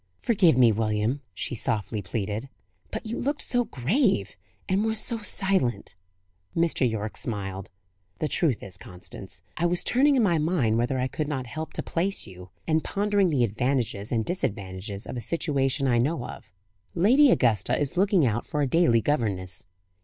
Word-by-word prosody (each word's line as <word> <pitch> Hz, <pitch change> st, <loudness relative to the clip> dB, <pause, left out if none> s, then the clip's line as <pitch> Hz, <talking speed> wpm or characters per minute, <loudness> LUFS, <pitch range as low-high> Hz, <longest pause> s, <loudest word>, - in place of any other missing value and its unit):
"Forgive 185 Hz, -, +3 dB
me, 120 Hz, -3 st, +6 dB
William," 110 Hz, +4 st, 0 dB
she 90 Hz, -, -4 dB
softly 105 Hz, 0 st, -2 dB
pleaded. 105 Hz, +5 st, -4 dB, 0.4 s
"But -, -, -5 dB
you 225 Hz, +2 st, -4 dB
looked 285 Hz, +3 st, -1 dB
so 245 Hz, -1 st, +2 dB
grave 185 Hz, -, +1 dB, 0.3 s
and 190 Hz, +2 st, +1 dB
were 220 Hz, 0 st, 0 dB
so 230 Hz, +1 st, +1 dB
silent." 190 Hz, -, 0 dB, 0.6 s
Mr. 165 Hz, -6 st, +2 dB
Yorke 110 Hz, -1 st, -4 dB
smiled. 95 Hz, -4 st, -4 dB, 0.5 s
"The 155 Hz, -, -1 dB
truth 150 Hz, -7 st, +1 dB
is, 90 Hz, -2 st, -8 dB
Constance, 90 Hz, +1 st, -10 dB
I 175 Hz, -, +2 dB
was 175 Hz, 0 st, +1 dB
turning 280 Hz, +3 st, +4 dB
in 250 Hz, -, +3 dB
my 170 Hz, -6 st, +3 dB
mind 150 Hz, -9 st, +1 dB
whether 125 Hz, +3 st, 0 dB
I 130 Hz, -, 0 dB
could 150 Hz, +3 st, -3 dB
not 135 Hz, -4 st, -3 dB
help 155 Hz, +6 st, -6 dB
to -, -, -3 dB
place 190 Hz, +4 st, -1 dB
you, 90 Hz, -2 st, -12 dB, 0.2 s
and 160 Hz, -1 st, +1 dB
pondering 200 Hz, -2 st, +1 dB
the 140 Hz, -6 st, +2 dB
advantages 115 Hz, -2 st, -1 dB
and 115 Hz, -3 st, 0 dB
disadvantages 100 Hz, -, -3 dB
of -, -, -6 dB
a -, -, -3 dB
situation 135 Hz, +1 st, 0 dB
I 120 Hz, -2 st, +3 dB
know 135 Hz, +1 st, 0 dB
of. -, -, -10 dB, 0.4 s
Lady 250 Hz, -, +5 dB
Augusta 110 Hz, -, +2 dB
is 145 Hz, +3 st, -1 dB
looking 190 Hz, -4 st, +3 dB
out 115 Hz, 0 st, -1 dB
for 150 Hz, -1 st, -1 dB
a -, -, +1 dB
daily 130 Hz, -6 st, +3 dB
governess." 100 Hz, -9 st, -1 dB
130 Hz, 170 wpm, -26 LUFS, 110-175 Hz, 0.6 s, me